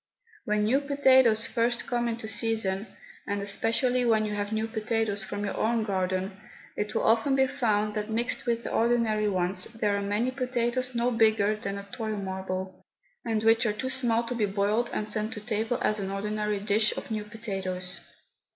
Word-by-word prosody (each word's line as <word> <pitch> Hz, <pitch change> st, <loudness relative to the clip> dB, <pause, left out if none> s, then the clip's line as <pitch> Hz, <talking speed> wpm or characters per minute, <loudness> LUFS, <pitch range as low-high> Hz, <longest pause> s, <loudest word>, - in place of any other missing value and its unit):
When 210 Hz, 0 st, +1 dB
new 255 Hz, +7 st, +3 dB
potatoes 260 Hz, -5 st, +4 dB
first 240 Hz, -1 st, 0 dB
come 240 Hz, -1 st, 0 dB
into 230 Hz, -1 st, -3 dB
season, 220 Hz, -3 st, 0 dB, 0.4 s
and 200 Hz, 0 st, -1 dB
especially 230 Hz, +5 st, +1 dB
when 220 Hz, -2 st, +3 dB
you 210 Hz, -, -3 dB
have 205 Hz, 0 st, -2 dB
new 220 Hz, 0 st, 0 dB
potatoes 220 Hz, -2 st, -1 dB
from 205 Hz, +2 st, -4 dB
your 200 Hz, -, -3 dB
own 225 Hz, 0 st, +1 dB
garden, 190 Hz, 0 st, -2 dB, 0.3 s
it 210 Hz, +1 st, -3 dB
will -, -, +1 dB
often 230 Hz, +5 st, +3 dB
be 265 Hz, 0 st, +4 dB
found 215 Hz, -5 st, 0 dB
that 210 Hz, 0 st, -3 dB
mixed 235 Hz, +2 st, -1 dB
with 235 Hz, 0 st, 0 dB
the -, -, -4 dB
ordinary 225 Hz, -2 st, +2 dB
ones 185 Hz, 0 st, -1 dB
there 215 Hz, -3 st, -1 dB
are 200 Hz, -, -1 dB
many 205 Hz, +5 st, 0 dB
potatoes 255 Hz, -1 st, -1 dB
no 235 Hz, +1 st, +1 dB
bigger 220 Hz, -2 st, +3 dB
than 200 Hz, -2 st, -4 dB
a 200 Hz, 0 st, -8 dB
toy 220 Hz, -3 st, -3 dB
marble, 190 Hz, -1 st, -4 dB, 0.4 s
and 220 Hz, -1 st, -1 dB
which 225 Hz, +1 st, +4 dB
are 210 Hz, -, +1 dB
too 260 Hz, +5 st, -3 dB
small 240 Hz, -3 st, +2 dB
to 235 Hz, -, -3 dB
be 220 Hz, -4 st, +1 dB
boiled 205 Hz, +4 st, +1 dB
and 210 Hz, -, -2 dB
sent 215 Hz, +1 st, -1 dB
to -, -, -6 dB
table 220 Hz, +2 st, -1 dB
as 215 Hz, -, +1 dB
an 195 Hz, -1 st, -3 dB
ordinary 210 Hz, +1 st, -2 dB
dish 210 Hz, +2 st, +2 dB
of -, -, -6 dB
new 215 Hz, -1 st, -1 dB
potatoes. 190 Hz, -4 st, -4 dB
215 Hz, 190 wpm, -28 LUFS, 205-235 Hz, 0.4 s, potatoes